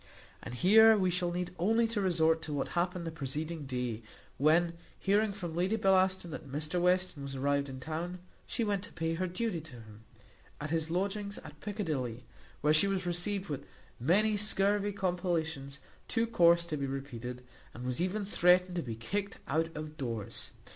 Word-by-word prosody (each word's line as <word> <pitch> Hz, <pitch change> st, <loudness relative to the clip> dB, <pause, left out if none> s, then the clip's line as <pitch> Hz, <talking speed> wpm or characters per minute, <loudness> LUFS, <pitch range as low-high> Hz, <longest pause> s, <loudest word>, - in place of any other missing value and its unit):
And -, -, -7 dB
here 220 Hz, -, +7 dB
we 185 Hz, -2 st, +2 dB
shall 175 Hz, 0 st, 0 dB
need 180 Hz, 0 st, -3 dB
only 225 Hz, +6 st, +3 dB
to 220 Hz, -3 st, 0 dB
resort 160 Hz, -3 st, +3 dB
to 150 Hz, -, -4 dB
what 145 Hz, -, -1 dB
happened 175 Hz, 0 st, -1 dB
the 165 Hz, -, -3 dB
preceding 155 Hz, +1 st, -4 dB
day, 125 Hz, -3 st, -2 dB, 0.4 s
when, 165 Hz, +4 st, +4 dB, 0.2 s
hearing 205 Hz, +2 st, +2 dB
from 175 Hz, -5 st, -5 dB
Lady 185 Hz, +5 st, +1 dB
Bellaston 190 Hz, -3 st, +2 dB
that 140 Hz, -2 st, -7 dB
Mr 150 Hz, +5 st, -1 dB
Western 180 Hz, -3 st, +2 dB
was 140 Hz, 0 st, -5 dB
arrived 140 Hz, +1 st, +1 dB
in 130 Hz, 0 st, -7 dB
town, 165 Hz, +6 st, -4 dB, 0.3 s
she 235 Hz, -, -1 dB
went 205 Hz, -3 st, 0 dB
to -, -, -13 dB
pay 165 Hz, 0 st, -1 dB
her 185 Hz, +3 st, -1 dB
duty 180 Hz, -1 st, -2 dB
to 155 Hz, -3 st, -13 dB
him, 110 Hz, -2 st, -13 dB, 0.6 s
at 150 Hz, +1 st, -4 dB
his 160 Hz, -1 st, 0 dB
lodgings 200 Hz, +3 st, -2 dB
at 150 Hz, 0 st, -12 dB
Piccadilly, 145 Hz, -, -3 dB, 0.4 s
where 150 Hz, +1 st, +4 dB
she 155 Hz, +6 st, +6 dB
was 190 Hz, -2 st, -1 dB
received 185 Hz, +3 st, 0 dB
with 140 Hz, -2 st, -5 dB, 0.3 s
many 205 Hz, -, +3 dB
scurvy 205 Hz, 0 st, +2 dB
compellations 170 Hz, -7 st, -2 dB, 0.3 s
too 230 Hz, -1 st, +1 dB
coarse 170 Hz, -6 st, +4 dB
to 155 Hz, -3 st, -3 dB
be 140 Hz, -1 st, -2 dB
repeated, 125 Hz, -2 st, -5 dB, 0.3 s
and 120 Hz, -, -9 dB
was 125 Hz, +4 st, -1 dB
even 195 Hz, +3 st, -1 dB
threatened 180 Hz, -1 st, +4 dB
to -, -, +1 dB
be 115 Hz, -6 st, -5 dB
kicked 200 Hz, -, -3 dB
out 165 Hz, +1 st, +1 dB
of 155 Hz, 0 st, -6 dB
doors. 115 Hz, -7 st, -3 dB
170 Hz, 180 wpm, -32 LUFS, 145-190 Hz, 0.6 s, here